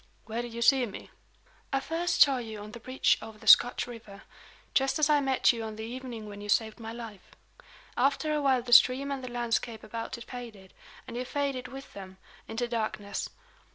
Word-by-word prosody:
"Where 230 +2 -3
did 240 -1 -7
you 235 +1 -2
see 260 -1 +5
me?" 200 - -10 0.6
"I 270 - +2
first 330 +5 -1
saw 275 -2 +7
you 220 -3 -7
on 210 +1 -9
the 235 - -9
bridge 255 +3 +1
over 220 -1 -10
the 220 - -15
Scotch 245 +2 +6
river 220 -5 -11 0.5
just 270 +2 +2
as 305 -1 +3
I 295 - +5
met 265 -2 +3
you 230 - -5
on 220 -1 -6
the 220 - -7
evening 235 -2 -7
when 205 0 -9
you 205 - -8
saved 220 +2 +1
my 225 -1 -6
life. 225 -4 -10 0.6
After 285 +4 +1
a 300 - 0
while 265 -3 +2
the 240 0 0
stream 265 +4 +6
and 270 -2 -4
the 255 - -5
landscape 235 -2 -2
about 230 +3 -5
it 235 - -9
faded, 230 -7 -10 0.3
and - - -8
you 245 - -2
faded 270 -1 -2
with 270 +2 -10
them, 190 -1 -10 0.3
into 235 +2 -2
darkness. 215 -4 -3
240 Hz, 205 wpm, -29 LUFS, 220-265 Hz, 0.6 s, saw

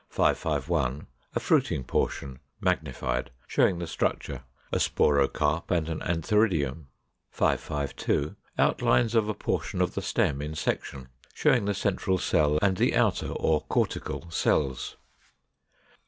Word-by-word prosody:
551. 75 -5 0 0.3
A - - +2
fruiting 65 - +1
portion, 65 +1 -2 0.2
magnified, 65 -9 -1 0.2
showing 90 - +2
the 85 - -3
structure; 70 -4 -2 0.3
a - - +1
sporocarp, 75 +3 +2
and 85 -3 +1
an 80 - -3
antheridium. 80 - +1 0.4
552. 70 -1 -1 0.2
Outlines 115 -2 +3
of 110 -2 +2
a 105 - -1
portion - - -2
of - - +1
the - - -2
stem 70 -1 0
in 75 +2 -5
section, 65 -4 -3 0.3
showing 125 -8 +3
the 100 0 0
central 95 -1 0
cell 75 -3 +2
and 95 -2 +3
the - - +2
outer - - +2
or 80 -1 +1
cortical 85 - -2
cells. 70 -4 0
80 Hz, 125 wpm, -27 LUFS, 70-95 Hz, 0.4 s, Outlines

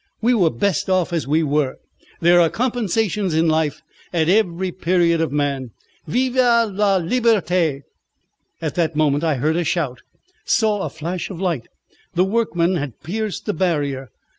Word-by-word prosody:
We 240 +2 +2
were 185 -8 +3
best 180 +9 -1
off 185 -2 +1
as 165 -4 -1
we 155 +3 +2
were. 145 -2 0 0.5
There 175 +1 +6
are 165 - +4
compensations 220 -6 -1
in 165 +1 +3
life 155 -2 0 0.3
at 165 -2 +1
every 185 -2 +1
period 170 -2 +1
of 165 - -1
man. 140 -3 -1 0.4
Vive 255 +1 0 0.4
la 200 0 +2
liberté!" 180 - +1 0.8
At 155 - -2
that 165 -3 0
moment 150 -1 +2
I 160 -3 +1
heard 155 +5 0
a 175 - +1
shout 150 -7 -1 0.4
saw 215 -3 +1
a - - -2
flash 165 +3 -5
of 185 -4 -7
light. 170 -11 -2 0.5
The 180 +2 +3
workmen 190 -4 +1
had 145 -6 -5
pierced 210 +5 -4
the 210 - -1
barrier. 145 -8 -1
170 Hz, 160 wpm, -20 LUFS, 155-195 Hz, 0.8 s, There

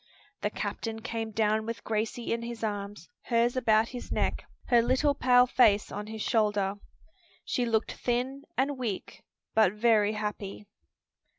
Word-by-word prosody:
The 210 - 0
captain 220 +2 -4
came 225 -1 -3
down 215 0 +1
with 230 0 -5
Gracie 225 +2 -2
in 230 - -2
his 235 -1 -6
arms, 205 -4 -4 0.2
hers 235 +1 +2
about 225 -3 +3
his 250 -1 -8
neck, - - 0 0.3
her 240 -2 +6
little 260 +5 +2
pale 250 -2 +5
face 215 -5 +3
on 210 +1 -5
his 220 -1 -5
shoulder. 205 -4 +1 0.7
She 245 -2 0
looked 225 -1 +1
thin 255 +3 -2 0.2
and 270 +1 0
weak, 220 -7 -4 0.3
but 215 -4 +4
very 215 -1 +3
happy. 210 -1 -5
225 Hz, 150 wpm, -29 LUFS, 210-240 Hz, 0.7 s, her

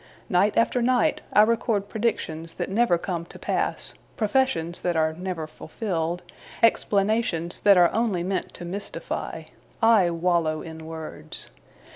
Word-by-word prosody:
Night 195 +3 +2
after 235 +2 +2
night, 255 +5 +2
I 210 - +7
record 220 -2 +1
predictions 165 -8 -2
that - - -4
never 215 -4 +3
come 170 -1 -3
to - - -13
pass, - - -2 0.2
professions 205 -7 +1
that 175 -1 0
are 160 0 +2
never 180 -1 -4
fulfilled, 170 0 -4 0.4
explanations 200 -6 +2
that 200 -2 +6
are 175 -1 +5
only 215 -6 0
meant 190 +1 -2
to 175 - -7
mystify. 195 +4 -5 0.4
I 225 -6 +5
wallow 170 -2 0
in 160 -1 -9
words. 160 - -3
180 Hz, 135 wpm, -25 LUFS, 165-220 Hz, 0.4 s, I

